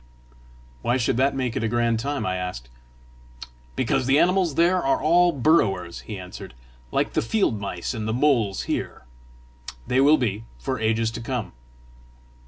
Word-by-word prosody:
"Why 120 +2 +1
should 120 -1 0
that 135 +2 +2
make 130 -3 -2
it - - -1
a - - +1
grand 115 0 +1
time?" 140 +4 -2
I 95 0 -1
asked. 90 -11 -5 1.1
"Because 130 0 0
the 135 +1 +4
animals 180 -2 +2
there 175 +2 +3
are 135 - +2
all 175 +2 +4
burrowers," 110 - +1
he 105 - -7
answered, 90 -8 -9 0.2
" 65 +1 -28
like - - 0
the - - +1
field 115 - 0
mice 95 0 -4
and 110 -2 -4
the - - 0
moles 120 -6 +1
here. - - -4 0.8
They 130 +1 +2
will 150 +3 +6
be, 110 -4 -2
for 130 -3 -3
ages 110 0 +1
to 115 +1 -6
come." 120 -2 -4
120 Hz, 170 wpm, -24 LUFS, 105-140 Hz, 1.1 s, will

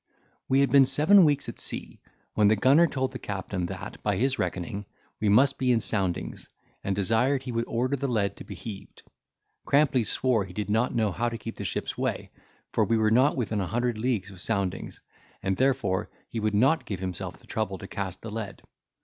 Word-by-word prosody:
We 135 +1 +4
had 140 -3 +2
been 135 0 +7
seven 180 +9 +6
weeks 145 -2 +1
at - - -7
sea, - - -5 0.3
when 105 -1 +4
the 110 - +5
gunner 140 +10 +5
told 130 -3 -2
the 125 - -7
captain 95 -3 -3
that, - - -7
by - - 0
his 135 +3 +1
reckoning, 95 +3 -3 0.3
we 110 - +1
must 130 +7 +4
be 130 -1 +2
in 120 - +4
soundings, 95 -4 -2 0.3
and 95 - -1
desired 115 +7 +2
he 130 - -5
would 115 0 -1
order 125 +4 0
the 140 0 -2
lead 105 -6 0
to - - -8
be 100 - -9
heaved. 95 +2 -9 0.6
Crampley 140 -4 +3
swore 120 0 +1
he 90 - -11
did 105 +1 -3
not 110 +4 +1
know 110 -3 +2
how 120 +6 -1
to 115 - -5
keep 115 0 -7
the 100 - -5
ship's 85 - -3
way, - - -2 0.4
for - - +3
we 115 - +2
were 110 -1 +2
not 130 +6 +4
within 110 -4 -1
a 95 - -2
hundred 120 +2 -1
leagues 110 -5 -1
of 95 -2 -10
soundings, 95 -2 -2 0.4
and 95 0 +1
therefore 125 -8 +1 0.2
he 115 - -4
would 105 -1 0
not 135 +9 +3
give 100 -4 -4
himself 90 -3 -5
the - - -21
trouble 105 -3 -2
to 100 - -9
cast 95 -3 -5
the 115 - -6
lead. 105 -2 -6
110 Hz, 210 wpm, -27 LUFS, 100-130 Hz, 0.6 s, been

